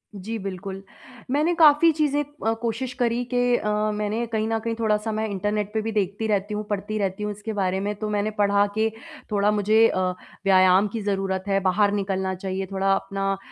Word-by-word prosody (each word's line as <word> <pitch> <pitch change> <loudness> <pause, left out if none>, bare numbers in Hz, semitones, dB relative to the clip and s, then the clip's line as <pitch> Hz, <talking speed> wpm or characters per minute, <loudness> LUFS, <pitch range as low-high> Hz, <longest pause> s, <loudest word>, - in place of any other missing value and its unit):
जी, 210 +4 -5
बिल्कुल। 195 0 -6 0.5
मैंने 305 +5 +2
काफ़ी 310 +1 +7
चीज़ें 295 -2 +1
अ, 290 -6 -3
कोशिश 240 +2 -2
करी 240 -1 0
कि 245 0 +3
अ, 210 - -2 0.2
मैंने 210 +3 -2
कहीं 220 0 0
न 225 0 0
कहीं 230 +1 -3
थोड़ा-सा 215 0 0
मैं 220 +1 -1
इंटरनेट 205 +1 -2
पर 220 - 0
भी 225 +1 -3
देखती 205 +1 -1
रहती 205 0 0
हूँ, 210 0 -2
पढ़ती 205 +1 -2
रहती 195 0 -2
हूँ 210 - -2
इसके 210 +2 -6
बारे 190 -2 0
में 205 +2 -2
तो 215 - -3
मैंने 210 +1 0
पढ़ा 200 0 +4
के 220 0 +2 0.4
थोड़ा 205 0 +2
मुझे 215 +2 +4
अ, 185 - -1 0.5
व्यायाम 185 +1 +5
की 225 - -3
ज़रूरत 195 -2 -1
है, 195 -1 +2
बाहर 195 +2 +2
निकलना 190 -2 -1
चाहिए 190 +1 -4
थोड़ा 195 0 +2
अपना 195 0 -1
210 Hz, 195 wpm, -24 LUFS, 195-225 Hz, 0.5 s, काफ़ी